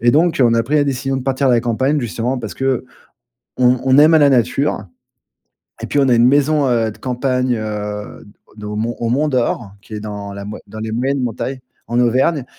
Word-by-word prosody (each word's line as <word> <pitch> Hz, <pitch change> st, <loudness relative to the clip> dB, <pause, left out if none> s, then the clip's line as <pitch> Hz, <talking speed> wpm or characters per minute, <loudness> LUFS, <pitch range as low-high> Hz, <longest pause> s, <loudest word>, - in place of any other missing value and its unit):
Et 120 Hz, +1 st, +4 dB
donc 160 Hz, 0 st, +2 dB
on 115 Hz, -1 st, +3 dB
a 115 Hz, -, +2 dB
pris 145 Hz, +6 st, 0 dB
la 145 Hz, -, +3 dB
décision 135 Hz, 0 st, -2 dB
de 130 Hz, -, -4 dB
partir 135 Hz, +1 st, 0 dB
de 125 Hz, -, +4 dB
la 120 Hz, -, +3 dB
campagne 130 Hz, +5 st, 0 dB
justement 120 Hz, +3 st, -2 dB
parce 110 Hz, -4 st, -6 dB
qu'on 135 Hz, -1 st, -1 dB, 0.8 s
on 130 Hz, +1 st, +3 dB
aime 155 Hz, +3 st, +7 dB
à 160 Hz, -, +6 dB
la 145 Hz, -1 st, +5 dB
nature. 130 Hz, 0 st, +1 dB, 1.0 s
Et -, -, -4 dB
puis 145 Hz, -, 0 dB
on 135 Hz, -, +3 dB
a -, -, +5 dB
une 120 Hz, +1 st, +5 dB
maison, 145 Hz, +1 st, +3 dB
heu, 115 Hz, -2 st, +1 dB
de -, -, -14 dB
campagne, 125 Hz, -1 st, -1 dB
heu, 105 Hz, -1 st, -5 dB, 0.3 s
de 105 Hz, -, -8 dB
au 105 Hz, -, -5 dB
Mont 115 Hz, +3 st, -2 dB
au 115 Hz, -, -1 dB
Mont 145 Hz, +5 st, +1 dB
d'Or 120 Hz, -6 st, -1 dB
qui 110 Hz, -, -13 dB
est -, -, -4 dB
dans 100 Hz, -1 st, -7 dB
la 100 Hz, 0 st, -7 dB
moi 105 Hz, -, -7 dB
dans 110 Hz, +2 st, -9 dB
les 110 Hz, 0 st, -4 dB
moyennes 130 Hz, +4 st, -1 dB
montagnes, 130 Hz, +3 st, -3 dB, 0.3 s
en 120 Hz, +1 st, 0 dB
Auvergne 130 Hz, +4 st, +2 dB
125 Hz, 225 wpm, -18 LUFS, 110-135 Hz, 1.0 s, aime